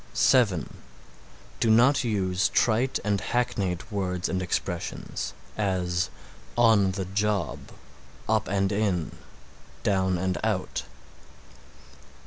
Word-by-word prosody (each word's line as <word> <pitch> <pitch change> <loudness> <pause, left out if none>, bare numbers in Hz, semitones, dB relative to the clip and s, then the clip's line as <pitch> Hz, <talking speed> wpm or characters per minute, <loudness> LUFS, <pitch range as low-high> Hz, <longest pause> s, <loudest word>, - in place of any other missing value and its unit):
(7) 105 - +3 0.8
Do 115 - +2
not 125 +5 +5
use 95 -5 +1
trite 120 +3 +2
and 100 -2 +1
hackneyed 100 -6 -1
words 90 -3 -1
and 95 - -1
expressions; 85 -1 -3 0.2
as, 90 -3 0 0.5
"on 110 -5 +5
the 95 -1 -3
job," 100 -4 -1 0.7
"up 110 -2 +1
and 100 +1 +1
in"; 100 -6 0 0.7
"down 95 -2 +2
and 95 +1 -1
out." - - -1
100 Hz, 100 wpm, -27 LUFS, 90-110 Hz, 0.8 s, not